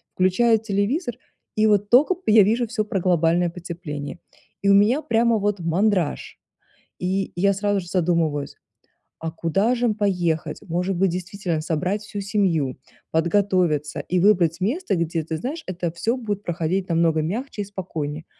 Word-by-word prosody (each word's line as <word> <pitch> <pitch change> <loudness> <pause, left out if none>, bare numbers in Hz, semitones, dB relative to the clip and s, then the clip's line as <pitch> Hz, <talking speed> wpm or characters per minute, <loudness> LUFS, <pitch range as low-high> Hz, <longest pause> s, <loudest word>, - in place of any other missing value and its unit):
Включаю 220 +5 +3
телевизор, 225 - -1 0.4
и 215 0 +4
вот 205 -1 +2
только 290 +9 +5
я 215 -1 +7
вижу 230 +5 +1
всё 215 -2 -2
про 195 -2 -2
глобальное 175 0 +2
потепление, 170 -3 -7 0.4
и 200 - +2
у - - +7
меня 225 +9 +4
прямо 230 -2 +2
вот 205 -1 0
мандраж. 175 0 0 0.6
И 190 +1 -1
я 200 +3 +3
сразу 205 +1 0
же 175 - -11
задумываюсь:" 165 -5 0 0.7
А 165 0 -3
куда 195 +9 +1
же 240 0 +1
поехать? 180 -6 -1
Может 180 +2 -1
быть, 190 +2 +3
действительно, 180 -2 -3
собрать 180 +6 -1
всю 205 -1 -6
семью, 185 - 0 0.4
подготовиться, 170 -3 +1
и 180 0 -1
выбрать 180 -4 +3
место, 255 - 0
где 165 0 -1
ты, 160 +1 -3
знаешь, 300 - -5
это 175 -2 -3
всё 225 +8 -1
будет 210 -5 -4
проходить 175 +2 -1
намного 165 -1 +2
мягче 210 - -3
и - - -4
спокойнее". 160 -6 -5
185 Hz, 155 wpm, -23 LUFS, 170-210 Hz, 0.7 s, я